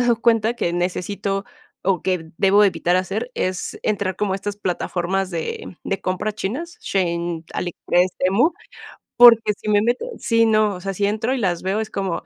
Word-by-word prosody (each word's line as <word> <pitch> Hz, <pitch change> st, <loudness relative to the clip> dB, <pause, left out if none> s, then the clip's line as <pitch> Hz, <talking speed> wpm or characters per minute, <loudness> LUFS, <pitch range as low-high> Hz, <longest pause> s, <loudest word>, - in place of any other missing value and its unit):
he 245 Hz, -, +2 dB
dado 230 Hz, -1 st, +2 dB
cuenta 225 Hz, -1 st, +3 dB
que 175 Hz, -7 st, -1 dB
necesito, 195 Hz, +2 st, -2 dB, 0.4 s
o 190 Hz, -1 st, +1 dB
que 180 Hz, -4 st, -1 dB
debo 200 Hz, +1 st, +4 dB
de 205 Hz, -, +6 dB
evitar 175 Hz, 0 st, 0 dB
hacer 200 Hz, +6 st, -2 dB
es 185 Hz, -1 st, -2 dB
entrar 200 Hz, -3 st, -1 dB
como 205 Hz, -1 st, -1 dB
a -, -, 0 dB
estas 205 Hz, +1 st, -5 dB
plataformas 185 Hz, 0 st, -2 dB
de 170 Hz, +1 st, -5 dB
de 195 Hz, -, -2 dB
compra 185 Hz, +3 st, -2 dB
chinas, 270 Hz, -, -5 dB
Shein, 170 Hz, -3 st, -1 dB
Aliexpress, 180 Hz, +1 st, 0 dB
Temu, 200 Hz, -, +3 dB, 0.6 s
porque, 230 Hz, -3 st, +8 dB
si 215 Hz, -, -8 dB
me 205 Hz, -, +4 dB
meto 240 Hz, -, 0 dB
sí, 230 Hz, -1 st, +2 dB
no, 215 Hz, -2 st, +3 dB
o 180 Hz, -, -8 dB
sea, 195 Hz, +1 st, -3 dB
si 200 Hz, +2 st, 0 dB
entro 220 Hz, +5 st, -1 dB
y 265 Hz, -, 0 dB
las 180 Hz, -6 st, -1 dB
veo, 195 Hz, +3 st, 0 dB
es 220 Hz, -, -3 dB
como,, 190 Hz, -4 st, -2 dB
195 Hz, 190 wpm, -21 LUFS, 180-215 Hz, 0.6 s, porque